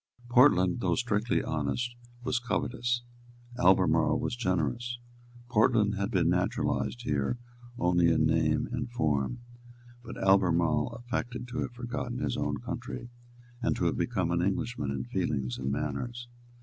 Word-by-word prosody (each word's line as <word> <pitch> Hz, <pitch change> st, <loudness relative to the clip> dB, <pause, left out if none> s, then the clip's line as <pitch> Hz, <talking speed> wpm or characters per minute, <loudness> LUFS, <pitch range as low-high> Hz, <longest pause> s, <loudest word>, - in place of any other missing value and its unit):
Portland, 120 Hz, -8 st, +5 dB
though -, -, +1 dB
strictly 115 Hz, -2 st, 0 dB
honest, 80 Hz, -, -2 dB, 0.3 s
was 130 Hz, 0 st, 0 dB
covetous; 120 Hz, 0 st, -1 dB, 0.6 s
Albemarle 95 Hz, -5 st, +4 dB
was -, -, -2 dB
generous. 100 Hz, -, -1 dB, 0.5 s
Portland 110 Hz, -2 st, +3 dB
had 100 Hz, -1 st, -1 dB
been -, -, +2 dB
naturalised 65 Hz, -2 st, 0 dB
here 70 Hz, -, 0 dB, 0.4 s
only 90 Hz, -2 st, +3 dB
in 80 Hz, -1 st, +3 dB
name 80 Hz, -1 st, +2 dB
and 120 Hz, -1 st, -3 dB
form; 80 Hz, -, 0 dB, 0.6 s
but 115 Hz, -, -8 dB
Albemarle 85 Hz, -5 st, +3 dB
affected 125 Hz, 0 st, -4 dB
to 125 Hz, +1 st, -4 dB
have 125 Hz, -, -3 dB
forgotten 120 Hz, 0 st, -4 dB
his -, -, -1 dB
own -, -, -1 dB
country, 120 Hz, -, -6 dB, 0.5 s
and -, -, +1 dB
to -, -, -1 dB
have -, -, +2 dB
become 85 Hz, -, 0 dB
an 85 Hz, 0 st, +1 dB
Englishman 100 Hz, -, -1 dB
in 70 Hz, -1 st, -2 dB
feelings 65 Hz, 0 st, -2 dB
and 65 Hz, 0 st, -2 dB
manners. 120 Hz, -, -3 dB
105 Hz, 135 wpm, -29 LUFS, 80-120 Hz, 0.6 s, Portland